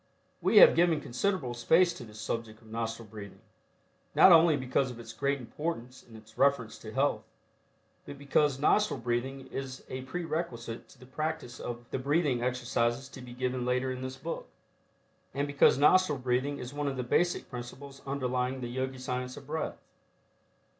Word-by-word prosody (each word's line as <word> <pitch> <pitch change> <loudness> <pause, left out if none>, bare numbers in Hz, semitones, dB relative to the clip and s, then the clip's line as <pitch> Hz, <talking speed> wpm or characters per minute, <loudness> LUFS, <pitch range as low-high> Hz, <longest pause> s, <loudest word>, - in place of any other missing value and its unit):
We - - +3
have - - +10
given 170 -3 +3
considerable 140 0 -1
space 165 +9 +4
to 140 - -9
this 105 -2 -12
subject 110 0 -4
of 110 - -17
nostril 115 0 -4
breathing, 100 -1 -10 0.7
not 190 - +8
only 165 -2 +7
because 130 0 0
of 120 -1 -9
its 115 0 -9
great 140 +4 0
importance 130 -1 -5
in 115 - -16
its 110 0 -15
reference 135 -5 +2
to 110 - -9
health, 135 +4 +1 0.9
but 140 - -8
because 140 0 +2
nostril 210 +9 +2
breathing 125 +3 -2
is 130 -1 -6
a 130 - -4
prerequisite 130 -6 -4
to - - -18
the 125 - -13
practice 145 -2 -4
of 120 0 -6
the - - -1
breathing 140 -2 +1
exercises 125 +1 0
to 135 - -10
be 125 -1 -10
given 125 0 -2
later 125 +1 0
in 130 0 -5
this 130 0 -5
book, 165 +5 -5 0.9
and 140 +1 0
because 145 -2 +4
nostril 150 +1 +5
breathing 130 +3 0
is 125 +2 -7
one 145 0 -2
of 135 -1 -2
the 125 - -1
basic 175 +8 +1
principles 135 +3 -9
underlying 130 -1 -1
the 120 - -4
Yogi 130 +1 -3
Science 125 0 -4
of 140 - -10
Breath. 155 +2 -3
130 Hz, 175 wpm, -30 LUFS, 120-145 Hz, 0.9 s, have